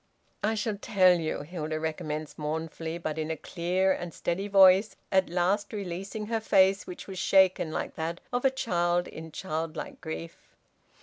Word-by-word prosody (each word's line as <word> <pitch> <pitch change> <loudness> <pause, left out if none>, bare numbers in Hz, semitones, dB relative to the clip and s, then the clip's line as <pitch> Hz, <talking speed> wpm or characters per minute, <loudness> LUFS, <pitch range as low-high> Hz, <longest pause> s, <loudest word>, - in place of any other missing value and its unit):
"I 220 +2 +1
shall 210 -1 -2
tell 185 -3 +4
you," 160 -2 -2
Hilda 155 -1 -4
recommenced 155 -1 -4
mournfully, 160 +2 -3
but 160 -2 -4
in 155 0 -2
a 160 - -2
clear 185 +3 0
and 175 -2 -3
steady 190 +4 -2
voice, 195 +1 +6 0.2
at 190 -1 +3
last 190 +5 0
releasing 200 +2 -4
her 225 +1 -1
face, 195 -2 +3
which 180 - -8
was 190 -2 -7
shaken 190 -4 +4
like - - -3
that 165 +2 -3
of 245 - 0
a 270 - +6
child 175 -9 0
in 160 0 -9
childlike 160 -2 -4
grief. 80 +1 -8
175 Hz, 165 wpm, -28 LUFS, 160-195 Hz, 0.2 s, voice